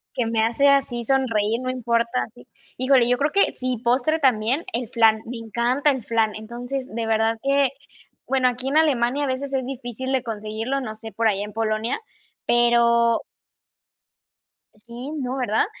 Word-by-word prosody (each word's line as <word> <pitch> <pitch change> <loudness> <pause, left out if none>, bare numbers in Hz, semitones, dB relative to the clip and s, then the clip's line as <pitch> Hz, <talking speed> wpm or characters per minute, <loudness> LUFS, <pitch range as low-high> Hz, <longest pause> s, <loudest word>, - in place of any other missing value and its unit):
Que 245 - 0
me 225 -1 +1
hace 240 +5 +2
así 270 -4 +2
sonreír, 230 -4 +1
no 255 - -3
importa, 235 0 0
así. 245 +3 -18 0.3
Híjole, 255 -2 +3
yo 245 - +3
creo 290 +3 0
que 400 - +3
sí, 255 -1 -2
postre 260 +6 +2
también, 255 +1 +2
el 235 0 -2
flan, 225 -2 +3
me 240 +1 -6
encanta 240 +6 0
el 260 -5 -4
flan. 225 -2 0
Entonces, 245 +4 -5
de 230 -1 -2
verdad 225 0 +1
que 275 0 +3 0.6
bueno, 265 -1 +2
aquí 250 +2 -2
en 290 - +1
Alemania 285 -2 +2
a - - -2
veces 270 +1 -3
es 260 -2 0
difícil 260 0 -5
de 260 -2 +1
conseguirlo, 225 +3 -3
no 220 -4 -6
sé, 220 0 -9
por 230 0 +1
allá 205 -1 +1
en 210 - -7
Polonia, 220 - -1 0.5
pero 235 -1 +3 1.6
sí, 240 +5 -8
no, 255 +1 -3
¿verdad?, 230 -4 +1
240 Hz, 170 wpm, -23 LUFS, 225-265 Hz, 1.6 s, Híjole